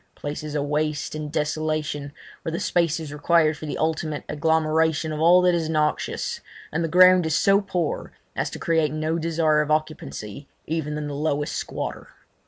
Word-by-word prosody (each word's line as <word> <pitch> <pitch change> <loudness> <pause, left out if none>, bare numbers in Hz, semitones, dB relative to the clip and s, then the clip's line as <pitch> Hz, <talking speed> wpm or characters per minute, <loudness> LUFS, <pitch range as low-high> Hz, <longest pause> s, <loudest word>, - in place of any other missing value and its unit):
Places 150 +1 -5
of 145 - 0
waste 150 0 -1
and 155 -1 -5
desolation, 150 -2 -2 0.3
where 165 - -4
the 165 - -2
space 170 -2 +1
is 155 -3 -7
required 155 +1 +3
for 155 - -8
the - - -3
ultimate 155 -1 -1
agglomeration 160 0 +1
of 155 - -4
all 175 +3 +6
that 180 -1 +4
is 165 -2 0
noxious, 155 -1 -1 0.3
and 160 +2 -1
the - - 0
ground 180 0 +6
is 160 - +1
so 200 +1 +4
poor 180 -5 -2 0.2
as - - -1
to - - -7
create 160 -3 +1
no 155 +2 -1
desire 160 -2 +2
of 150 - -3
occupancy 145 - -3 0.2
even 150 -1 -2
in 150 - -3
the 145 - -5
lowest 145 0 -1
squatter. - - -4
155 Hz, 180 wpm, -24 LUFS, 150-165 Hz, 0.3 s, all